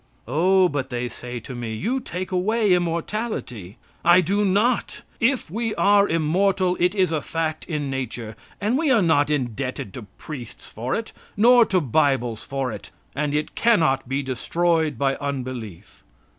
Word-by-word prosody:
"Oh," 180 +8 +4
but 145 -5 -3
they 125 -1 -2
say 120 0 -7
to 125 - -8
me, 120 -2 -4
"you 235 - -1
take 185 -6 -6
away 205 +2 +2
immortality." 170 - -3 0.3
I 175 +2 +7
do 200 +4 +1
not. 205 +5 +1 0.2
If 245 - +1
we 225 +2 -2
are 200 0 +4
immortal 180 +3 +2
it 180 +3 +2
is 185 -4 +2
a 155 -2 0
fact 160 +1 -3
in 150 -4 -3
nature, 120 -4 -5 0.2
and 220 +6 +1
we 320 -2 +1
are 230 -6 +4
not 150 -3 +3
indebted 130 -6 -3
to 110 -5 -9
priests 130 -7 -9
for 120 +4 -3
it, 225 0 -4 0.3
nor 235 +2 +6
to 185 - +2
Bibles 130 -4 +1
for 135 -2 -3
it, 105 - -9 0.3
and 145 0 -1
it 150 - -2
cannot 160 - +2
be 135 +1 -1
destroyed 160 +3 0
by 135 +1 +1
unbelief. 130 -9 -6
155 Hz, 160 wpm, -23 LUFS, 130-195 Hz, 0.3 s, I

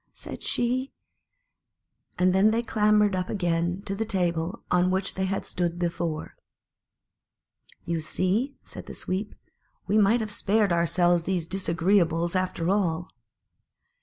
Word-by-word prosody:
said - - -8
she; 255 +3 0 1.3
and 180 0 +3
then 195 +3 +5
they 230 +2 +1
clambered 210 -2 +3
up 185 0 -2
again 175 -1 -1
to 195 - -3
the 210 +3 -1
table 175 -5 -1
on 180 0 +3
which 190 +1 -1
they 190 - -1
had 195 +1 -2
stood 175 -1 -2
before. 170 -2 -3 1.5
"You 170 -1 -1
see," 200 - 0
said - - -10
the - - -8
Sweep, 195 +3 -3 0.5
"we 215 - +2
might 215 +4 +4
have 215 -1 -4
spared 205 -2 +2
ourselves 170 0 +2
these 180 -4 -1
disagreeables, 170 -1 +1
after 185 -2 -1
all." 180 -4 0
185 Hz, 135 wpm, -26 LUFS, 170-205 Hz, 1.5 s, then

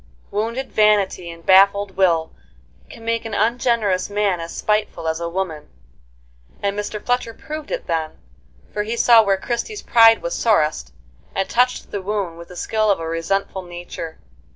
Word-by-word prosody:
Wounded 230 +6 -2
vanity 205 -4 +2
and 165 0 -11
baffled 200 +1 +5
will 170 -4 +2 0.6
can 225 - -12
make 230 0 0
an 225 -2 -5
ungenerous 225 -4 +1
man 205 -3 0
as 165 0 -6
spiteful 210 -6 -1
as 160 0 -1
a 170 0 -3
woman; 170 -4 -4 1.0
and 200 0 0
Mr. 210 +1 -4
Fletcher 245 -2 -1
proved 310 -1 -7
it - - -3
then, 160 -1 -2 0.6
for 210 - -1
he 225 +3 -3
saw 235 -1 +7
where 200 -2 +2
Christie's 240 - -4
pride 225 -1 +6
was - - -2
sorest, 205 -10 +1 0.4
and 195 - 0
touched 250 +1 +1
the 200 - -3
wound 190 -4 -3
with 170 - -10
the 180 - -12
skill 215 +3 0
of 200 - +2
a 165 - -4
resentful 190 +4 -2
nature. 175 -2 -8
200 Hz, 165 wpm, -21 LUFS, 175-225 Hz, 1.0 s, saw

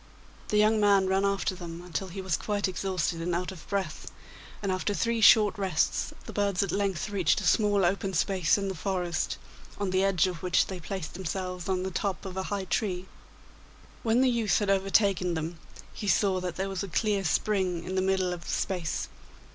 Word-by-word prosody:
The 210 - +1
young 215 +1 +4
man 200 -2 +4
ran 190 +1 +1
after 200 -1 0
them 175 -1 -8
until 180 +2 -4
he 190 +2 -6
was 185 -3 +1
quite 205 -1 -1
exhausted 180 -3 -2
and 170 +1 -1
out 180 +2 -2
of 180 -5 -12
breath, 195 -6 -3 0.5
and 195 - 0
after 185 +2 -1
three 230 +1 0
short 210 0 +7
rests 185 -5 0
the - - -8
birds 200 -2 +1
at 195 - -2
length 200 -1 -1
reached 185 -6 +2
a - - -5
small 205 -3 +3
open 190 +1 0
space 185 -2 +2
in 200 -1 -2
the 190 - -2
forest, 180 -2 -2 0.4
on 200 -2 -2
the 185 +1 +2
edge 195 -3 +3
of 180 -3 -4
which 180 -1 +3
they 190 -2 -6
placed 175 -1 -5
themselves 180 0 -4
on 185 -1 0
the 190 - -3
top 195 +1 -2
of 190 -1 -6
a 190 - -1
high 200 -2 -2
tree. 185 -2 -1 1.0
When 230 +2 +2
the 260 - +4
youth 230 -3 +2
had 205 -2 +1
overtaken 195 -2 +2
them, 160 +1 -4 0.3
he 205 - -6
saw 195 -2 +3
that 180 -2 -4
there 190 +1 -2
was 195 -1 -3
a 200 - -3
clear 200 +2 0
spring 185 -1 0
in 185 - -5
the 190 - +1
middle 190 -1 +1
of 170 -1 -8
the - - -4
space. 180 -4 -2
190 Hz, 205 wpm, -28 LUFS, 180-200 Hz, 1.0 s, short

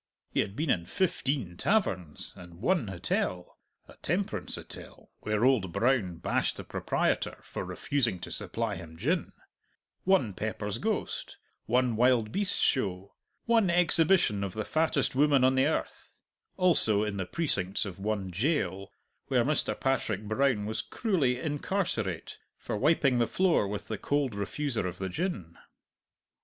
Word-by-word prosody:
He - - 0
had 95 - -1
been 150 0 0
in 85 -1 0
fifteen 130 - -1
taverns, 95 - 0
and 90 -3 -12
one 130 - +1
hotel 90 -1 -2 0.3
(a - - -14
temperance 185 +6 -1
hotel, - - -11
where 110 +2 0
old 115 -9 +3
Brown 110 -4 +1
bashed - - 0
the - - -6
proprietor - - -1
for - - -5
refusing 125 -9 0
to - - -6
supply - - -3
him 80 0 -10
gin); - - 0 0.7
one 180 - +3
Pepper's 105 +1 -3
Ghost; 220 -1 -2 0.3
one 125 0 +2
Wild 120 -2 +3
Beasts' 200 - +1
Show; 95 -6 0 0.3
one 230 -5 +3
Exhibition 170 - +3
of 95 -2 -3
the 110 0 -3
Fattest 155 -3 +1
Woman 140 -1 +4
on 130 +1 +5
the 130 +1 +3
Earth; 160 - -3 0.4
also 155 - +4
in 105 -2 -2
the 95 -2 -3
precincts 105 - 0
of 95 -2 -7
one 100 -2 -2
jail, 100 - -1 0.4
where - - +2
Mr. - - 0
Patrick 115 -6 0
Brown 110 0 +1
was 110 +1 -2
cruelly 150 - 0
incarcerate 145 - -2 0.2
for - - -4
wiping 135 0 +3
the 120 - +3
floor 180 - +2
with 105 0 -5
the 110 -2 -4
cold 145 -4 0
refuser 105 +2 -2
of 90 - -6
the 95 0 -3
gin. 95 - -4
115 Hz, 150 wpm, -29 LUFS, 100-150 Hz, 0.7 s, on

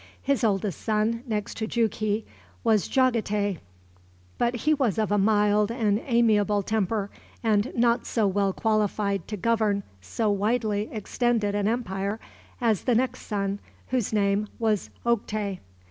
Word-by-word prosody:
His 275 -2 +1
oldest 200 -4 0
son, 220 +2 0
next 210 -3 -3
to 220 - -2
Jughi, 215 -2 0 0.4
was 215 -4 +3
Jagatay, 210 - +1 0.8
but 240 +1 +1
he 305 +6 +2
was 260 -8 +1
of 215 -2 0
a 205 - +3
mild 210 0 +3
and 220 -3 +1
amiable 215 -4 +2
temper, 210 -1 -1 0.3
and 215 0 +2
not 235 0 +2
so 225 -3 +1
well 195 0 +1
qualified 205 -3 0
to 210 - -4
govern 215 -1 +1 0.2
so 205 - -1
widely 210 0 0
extended 220 -1 0
an 205 0 0
empire 205 -3 -2 0.4
as 225 -5 +1
the 245 - +3
next 255 +1 -1
son, 200 -1 -1 0.3
whose 250 -5 0
name 205 0 +1
was 220 -3 0 0.2
Oktay. 210 -4 -1
215 Hz, 140 wpm, -26 LUFS, 205-230 Hz, 0.8 s, was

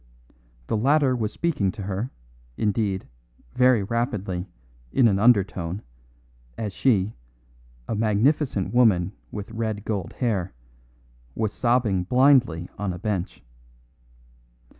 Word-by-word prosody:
The - - -1
latter 135 +2 +3
was 110 -3 -2
speaking 145 - 0
to 100 - -7
her, 100 +5 -3 0.5
indeed, 100 -2 -1 0.5
very 125 -4 +4
rapidly, 100 -5 -2 0.4
in 125 - +4
an 100 -3 +2
undertone, 100 -5 +2 0.7
as 105 -3 -4
she, 110 -5 +2 0.7
a - - -2
magnificent 110 +1 +1
woman 100 -7 +4 0.2
with 105 +1 -6
red 110 -2 -3
gold 100 -6 -3
hair, 100 - -1 0.8
was 110 -2 -1
sobbing 120 -7 +1
blindly 125 - +4
on 100 -3 -2
a - - -6
bench. 95 - -3
105 Hz, 110 wpm, -24 LUFS, 95-120 Hz, 0.8 s, very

